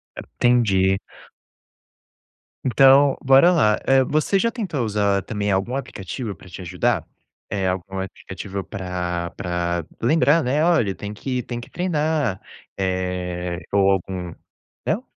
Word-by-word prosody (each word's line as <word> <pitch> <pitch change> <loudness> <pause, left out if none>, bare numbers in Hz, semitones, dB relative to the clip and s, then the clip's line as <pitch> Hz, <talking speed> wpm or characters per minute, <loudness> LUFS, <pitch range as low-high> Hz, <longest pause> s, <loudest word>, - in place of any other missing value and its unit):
É, - - -6 0.2
entendi. 100 -6 +3 1.7
Então, 135 +2 +5
bora 135 +7 +6
lá, 110 -11 +3
eh, 135 0 +5
você 155 +8 +1
já 230 +2 +1
tentou 180 - -3
usar 100 -2 +1
também 105 -1 -2
algum 95 +7 0
aplicativo 110 -3 -5
pra 90 - -16
te 95 - -9
ajudar? 85 - 0 0.4
Eh, 95 -2 -1
algum 95 +1 -3
aplicativo 95 0 -6
pra 90 -3 -4
pra 85 -2 -2 0.2
lembrar, 150 +5 +4
né: 145 +5 +1
"Olha, 120 - +2
tem 105 0 -6
que 125 +2 -3
tem 120 -1 -5
que 120 - -11
treinar", 155 - -1 0.4
eh, 90 -2 -2
ou 100 -1 +4
algum. 90 -2 -3 0.5
Não? - - -1
100 Hz, 130 wpm, -22 LUFS, 95-135 Hz, 1.7 s, bora